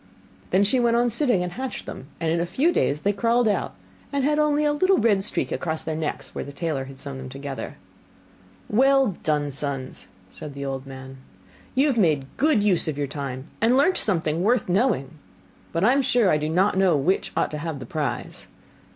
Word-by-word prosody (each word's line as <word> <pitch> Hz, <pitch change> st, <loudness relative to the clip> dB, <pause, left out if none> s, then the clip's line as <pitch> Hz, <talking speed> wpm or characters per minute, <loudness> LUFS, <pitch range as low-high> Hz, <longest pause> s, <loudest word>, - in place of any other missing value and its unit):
Then 195 Hz, -, +3 dB
she 230 Hz, +6 st, +3 dB
went 235 Hz, -1 st, +3 dB
on 240 Hz, 0 st, +2 dB
sitting, 235 Hz, -6 st, +2 dB
and 180 Hz, -, -4 dB
hatched 260 Hz, +6 st, -5 dB
them: 130 Hz, -, -8 dB
and 165 Hz, -1 st, 0 dB
in 170 Hz, -, +1 dB
a 170 Hz, -, 0 dB
few 285 Hz, -, +2 dB
days 150 Hz, -, 0 dB
they 205 Hz, -, +1 dB
crawled 230 Hz, +3 st, +2 dB
out, 210 Hz, -, -1 dB, 0.4 s
and 280 Hz, -1 st, 0 dB
had 300 Hz, +2 st, +2 dB
only 300 Hz, 0 st, +2 dB
a 295 Hz, -, +2 dB
little 370 Hz, +6 st, +3 dB
red 210 Hz, -4 st, +3 dB
streak -, -, 0 dB
across 160 Hz, -2 st, -2 dB
their 160 Hz, -, -3 dB
necks, 155 Hz, -1 st, -4 dB
where -, -, -4 dB
the 140 Hz, -, -8 dB
tailor 145 Hz, -2 st, -3 dB
had 135 Hz, 0 st, -11 dB
sewn 140 Hz, -1 st, -7 dB
them 130 Hz, 0 st, -7 dB
together. 135 Hz, 0 st, -6 dB, 0.9 s
'Well 265 Hz, -2 st, +3 dB
done, 150 Hz, -2 st, 0 dB
sons!' 135 Hz, -1 st, -4 dB, 0.2 s
said 145 Hz, -2 st, -9 dB
the 140 Hz, 0 st, -5 dB
old 135 Hz, 0 st, -4 dB
man; 130 Hz, 0 st, -9 dB, 0.6 s
'you 270 Hz, +3 st, +4 dB
have 275 Hz, -5 st, +1 dB
made 155 Hz, -8 st, +2 dB
good 285 Hz, -8 st, +3 dB
use 190 Hz, -6 st, +2 dB
of 155 Hz, -3 st, -2 dB
your 145 Hz, -, 0 dB
time, 135 Hz, -2 st, -5 dB, 0.2 s
and 235 Hz, +3 st, +4 dB
learnt 330 Hz, +7 st, +4 dB
something 165 Hz, -5 st, +1 dB
worth 235 Hz, +6 st, +2 dB
the 175 Hz, -, -2 dB
knowing; 160 Hz, -, 0 dB, 0.5 s
but 165 Hz, -, -1 dB
I 240 Hz, +5 st, +5 dB
am 280 Hz, -, +3 dB
sure 245 Hz, -6 st, +3 dB
I 150 Hz, -, +3 dB
do 150 Hz, +1 st, -2 dB
not 190 Hz, +4 st, +2 dB
know 185 Hz, -5 st, +4 dB
which 175 Hz, +8 st, 0 dB
ought -, -, +1 dB
to 150 Hz, -, -4 dB
have 160 Hz, -1 st, -4 dB
the 130 Hz, -, -8 dB
prize. 140 Hz, -2 st, -4 dB
175 Hz, 215 wpm, -24 LUFS, -, 0.9 s, I